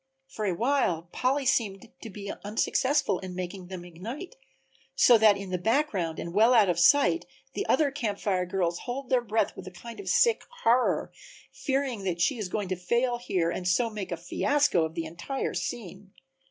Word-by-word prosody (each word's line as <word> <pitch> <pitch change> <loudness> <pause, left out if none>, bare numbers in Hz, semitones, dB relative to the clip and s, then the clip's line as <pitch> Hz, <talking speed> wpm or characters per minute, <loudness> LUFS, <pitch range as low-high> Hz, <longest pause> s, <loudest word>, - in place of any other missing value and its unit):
For 220 -5 -5
a 185 -3 0
while 210 - 0
Polly 270 +2 0
seemed 225 -3 0
to 225 - -7
be 200 0 -6
unsuccessful 230 +3 +1
in 185 -1 -7
making 185 0 -6
them 180 -1 -7
ignite, 230 - -8 0.6
so 245 - +6
that 210 -2 +6
in 195 -1 -7
the 180 - -1
background 205 - 0
and 170 - -5
well 225 +5 +5
out 210 -5 +5
of 175 -1 +1
sight 285 - +4 0.3
the - - -3
other 295 -3 +3
Camp 230 -8 -2
Fire 185 -3 -1
girls 175 -2 -1
hold 260 +2 -6
their 255 -1 +4
breath 220 -2 0
with 185 - -9
a - - -7
kind 230 +6 -10
of 405 - -5
sick 480 -1 +4 0.2
horror, 245 +2 +2 0.4
fearing 265 -6 -2
that 175 -2 -1
she 235 +8 +1
is 200 -4 -3
going 200 -1 -3
to 185 - 0
fail 240 +7 0
here 180 -8 0
and 180 +1 -4
so 230 +6 +2
make 205 -4 -6
a 175 - -2
fiasco 280 - +1
of 160 +1 -7
the 165 -1 -3
entire 170 - -4
scene. 195 -3 -5
205 Hz, 195 wpm, -28 LUFS, 180-255 Hz, 0.6 s, so